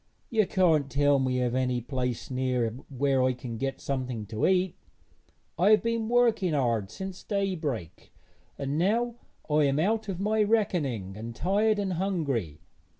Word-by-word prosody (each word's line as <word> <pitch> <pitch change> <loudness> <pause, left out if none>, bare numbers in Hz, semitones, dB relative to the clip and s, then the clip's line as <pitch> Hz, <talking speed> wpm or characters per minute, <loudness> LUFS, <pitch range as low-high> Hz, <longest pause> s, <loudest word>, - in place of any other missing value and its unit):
'You 215 -4 +3
can't 160 -7 +3
tell 145 0 +3
me 130 -1 0
of 120 -1 0
any 125 -1 +1
place 125 0 -3
near 125 -3 0 0.2
where 135 0 +1
I 130 0 +3
can 120 -3 -7
get 135 0 -2
something 125 -5 -3
to 110 +1 0
eat? 185 -1 +2 0.8
I 185 +4 +5
have 215 +1 +5
been 230 -1 -1
working 235 -8 +3
hard 115 -8 +1
since 190 - -7
daybreak, 165 - -3 0.5
and 140 +2 -2
now 230 +6 +1 0.3
I 150 -1 +3
am 140 0 +1
out 215 +6 +1
of 185 -2 -3
my 215 +2 +1
reckoning, 155 - 0
and 115 +2 -7
tired 205 - +2
and 195 -2 -1
hungry.' 145 - -2
145 Hz, 155 wpm, -28 LUFS, 125-195 Hz, 0.8 s, I